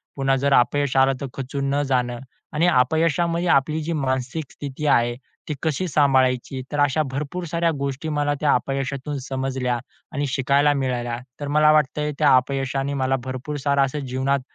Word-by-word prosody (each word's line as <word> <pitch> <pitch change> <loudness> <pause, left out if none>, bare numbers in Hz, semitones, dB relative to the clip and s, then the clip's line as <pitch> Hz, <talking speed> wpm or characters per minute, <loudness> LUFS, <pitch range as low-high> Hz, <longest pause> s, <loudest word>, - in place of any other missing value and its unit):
पुन्हा 135 -1 +1
जर 140 +1 +1
अपयश 140 +2 +2
आलं, 135 0 +5
तर - - -2
खचून 135 +1 -4
न 145 - +2
जाणं 125 -2 0 0.3
आणि 160 +3 +2
अपयशामध्ये 165 +5 +2
आपली 155 +3 -1
जी 170 - -2
मानसिक 130 +1 -2
स्थिती 145 +1 -6
आहे, 120 -3 +3 0.3
ती - - 0
कशी 160 +3 0
सांभाळायची? 130 -3 +2
तर 145 - -2
अशा 145 +2 +2
भरपूर 150 +6 -4
साऱ्या 170 0 +1
गोष्टी 140 +3 -3
मला 145 -1 0
त्या 150 - +4
अपयशातून 135 +1 -2
समजल्या 130 -2 -1 0.3
आणि 145 -1 -2
शिकायला 140 +2 +2
मिळाल्या. 125 -3 -2 0.2
तर 145 - -4
मला 150 +1 +4
वाटतंय 150 0 +1
त्या 145 -4 +6
अपयशाने 135 +1 0
मला 135 -1 +1
भरपूर 130 +3 -5
सारं 140 -1 +3
असं 145 +3 -4
जीवनात 130 +2 0
140 Hz, 165 wpm, -23 LUFS, 130-150 Hz, 0.3 s, त्या